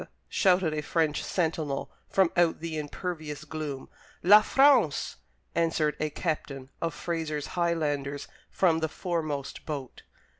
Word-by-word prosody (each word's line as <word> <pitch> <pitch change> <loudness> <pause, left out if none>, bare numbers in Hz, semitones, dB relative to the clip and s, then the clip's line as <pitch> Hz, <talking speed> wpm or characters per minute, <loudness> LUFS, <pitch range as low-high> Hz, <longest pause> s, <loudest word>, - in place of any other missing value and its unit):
_" - - -8 0.2
shouted 180 -4 +3
a 150 - -1
French 155 -1 0
sentinel 160 -5 -1 0.2
from 190 -3 +3
out 175 -2 +3
the 165 0 -4
impervious 155 -1 -4
gloom. 150 -3 -5 0.4
"La 205 +4 +9
France!" 265 - +4 0.4
answered 165 -3 +1
a 155 - 0
captain 140 -4 -4
of 165 - 0
Fraser's 155 -4 -3
Highlanders 145 -5 -1 0.2
from 170 -4 +2
the 160 -1 -1
foremost 155 -6 -3
boat. 140 -5 -5
160 Hz, 125 wpm, -28 LUFS, 150-170 Hz, 0.4 s, La